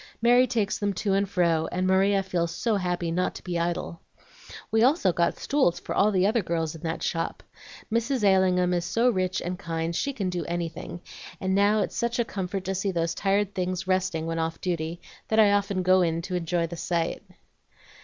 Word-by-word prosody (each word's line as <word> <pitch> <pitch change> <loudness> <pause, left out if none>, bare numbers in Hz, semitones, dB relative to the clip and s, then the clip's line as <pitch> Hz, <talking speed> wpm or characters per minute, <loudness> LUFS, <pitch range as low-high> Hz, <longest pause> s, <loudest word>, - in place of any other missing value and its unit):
Mary 245 +2 +5
takes 220 -5 -1
them 205 -1 0
to 195 +1 -1
and 195 0 +1
fro, 170 -4 +1
and 185 +1 -1
Maria 195 +1 +3
feels 175 -3 -1
so 215 +7 -1
happy 175 -2 -2
not 180 +2 -1
to - - -9
be 175 -2 -2
idle. 170 0 -3 0.7
We 220 - +3
also 250 - +3
got 170 0 +1
stools, 275 -12 +1
for - - -5
all 205 - +4
the 185 -2 +2
other 220 +3 +2
girls 165 -3 -2
in 160 - -11
that 165 -1 -3
shop. 165 -1 -2 0.5
Mrs. 235 +1 0
Allingham 185 -2 +3
is 175 -1 0
so 230 +8 +2
rich 185 -2 -1
and 180 +1 -4
kind 165 0 -3
she 280 - 0
can 200 -9 -3
do 175 -2 -2
anything, 170 0 -5 0.4
and 190 0 -1
now 205 +2 +3
it's - - -3
such 235 0 -1
a 235 - +1
comfort 190 -2 -4
to 190 +1 -2
see 195 +1 -1
those 165 -2 -1
tired 200 0 0
things 185 0 -2
resting 185 -3 0
when 165 0 -2
off 165 0 -2
duty 170 -1 -3 0.3
that 220 - 0
I 210 -2 +6
often 200 -2 +1
go 185 +1 +5
in 165 -2 +1
and 170 +3 -5
enjoy 175 -1 0
the 170 +1 -7
sight." 170 0 -1
185 Hz, 205 wpm, -26 LUFS, 170-200 Hz, 0.7 s, I